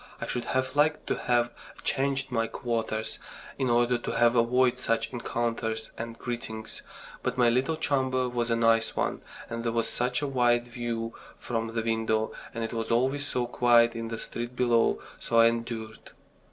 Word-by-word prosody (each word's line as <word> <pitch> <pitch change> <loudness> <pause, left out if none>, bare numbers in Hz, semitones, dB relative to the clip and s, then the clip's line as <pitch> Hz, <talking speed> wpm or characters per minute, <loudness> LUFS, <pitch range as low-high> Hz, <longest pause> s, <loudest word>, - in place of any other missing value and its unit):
I - - -3
should 125 - -3
have 130 +1 -1
liked 150 +1 +2
to - - 0
have 120 -1 +1 0.3
changed 135 -1 0
my 115 -2 +1
quarters 115 -2 -3 0.4
in 130 -2 +1
order 120 +1 +3
to - - -4
have 120 +1 +4
avoided 125 +2 +3
such 115 +3 0
encounters 115 -2 -2
and 115 0 -6
greetings; 110 -2 -6 0.4
but 125 0 -2
my 120 -1 +5
little 130 +7 +1
chamber 130 -4 +1
was 120 -1 -1
a 115 - +3
nice 115 0 +3
one, - - -1 0.3
and 115 0 -4
there 115 - 0
was 115 0 0
such 125 +2 -1
a - - 0
wide 120 -2 +2
view 120 -1 -3 0.2
from 115 -1 -3
the 115 - 0
window, 110 -1 0 0.2
and 115 -1 -4
it 115 - -4
was 115 -1 -3
always 135 +5 +1
so 125 -1 0
quiet 120 -1 +4
in 115 0 -3
the 115 0 -4
street 120 +2 -5
below 120 -2 +3 0.2
so 115 - -1
I 115 - +8
endured. 115 -1 -4
120 Hz, 180 wpm, -28 LUFS, 115-125 Hz, 0.4 s, I